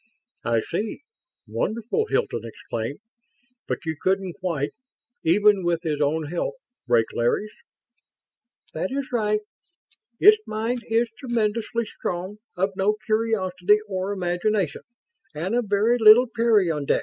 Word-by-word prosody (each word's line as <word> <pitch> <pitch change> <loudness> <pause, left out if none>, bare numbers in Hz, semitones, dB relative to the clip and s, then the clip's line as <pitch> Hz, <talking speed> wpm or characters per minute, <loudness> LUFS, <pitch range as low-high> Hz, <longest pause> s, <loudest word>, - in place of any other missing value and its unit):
"I 115 -1 +2
see. 205 - -4 0.5
Wonderful!" 235 - -1
Hilton 115 - 0
exclaimed. 115 - -5 0.7
"But - - -3
you 160 0 -2
couldn't 190 -1 0
quite 165 -6 -2 0.5
even 200 +3 +4
with 170 0 0
his 150 -3 -1
own 155 +2 +1
help 170 - -3 0.3
break 120 -2 +4
Larry's?" 120 - 0 1.2
"That - - -2
is 275 0 -3
right. 210 -3 +1 0.8
Its 425 +2 +7
mind 225 +3 -2
is 230 +1 +2
tremendously 235 -1 -1
strong, 185 0 -5 0.2
of 190 +2 0
no 200 +2 +2
curiosity 210 -3 +2
or 190 0 -2
imagination, 185 -1 -1 0.5
and 175 +7 -2
of 240 -1 +1
very 215 +4 +3
little 220 +3 +8
peyondix." 205 -11 +2
200 Hz, 120 wpm, -24 LUFS, 170-225 Hz, 1.2 s, little